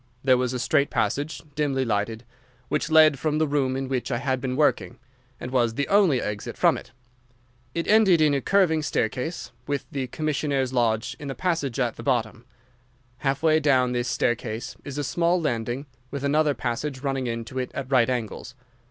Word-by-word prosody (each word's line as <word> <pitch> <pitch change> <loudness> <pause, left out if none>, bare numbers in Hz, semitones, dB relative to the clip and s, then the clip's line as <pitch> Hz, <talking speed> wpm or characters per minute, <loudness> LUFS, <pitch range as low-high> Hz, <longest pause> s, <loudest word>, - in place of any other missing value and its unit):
There 130 -1 +5
was 125 -1 0
a 130 - -2
straight 140 +3 +2
passage, 145 +9 -1
dimly 135 -3 0
lighted, 110 +1 -2 0.4
which 150 - -1
led 155 -3 +6
from 155 +1 0
the 155 - +2
room 140 -3 0
in 135 0 -3
which 130 -2 -2
I 120 - 0
had 130 0 -1
been 130 -1 -2
working, 145 -4 +1 0.4
and 125 - -6
was 120 -3 +1
the 140 - -1
only 195 -10 +4
exit 105 -2 -4
from - - +4
it. - - -9 0.8
It 170 - -2
ended 205 -5 +5
in 155 -2 +4
a 140 - +1
curving 180 -4 +3
staircase, 130 +3 -2 0.2
with 140 -2 -2
the 135 -2 -3
commissionnaire's 140 -2 -1
lodge 120 0 +1
in 145 - -7
the 135 - -4
passage 160 -9 -1
at 120 -3 0
the - - -7
bottom. 120 -3 -1 0.7
Half 140 +2 -1
way 155 -1 +4
down 130 -4 +3
this 120 0 -1
staircase 120 +1 -2
is 140 0 -7
a 145 - -1
small 170 +5 +1
landing, 120 -2 -2 0.2
with 140 0 -5
another 145 0 +2
passage 130 +3 -3
running 135 -2 -1
into 115 +2 -4
it 125 - -2
at 135 0 -5
right 130 -2 +4
angles. 120 0 -4
135 Hz, 185 wpm, -25 LUFS, 125-150 Hz, 0.8 s, led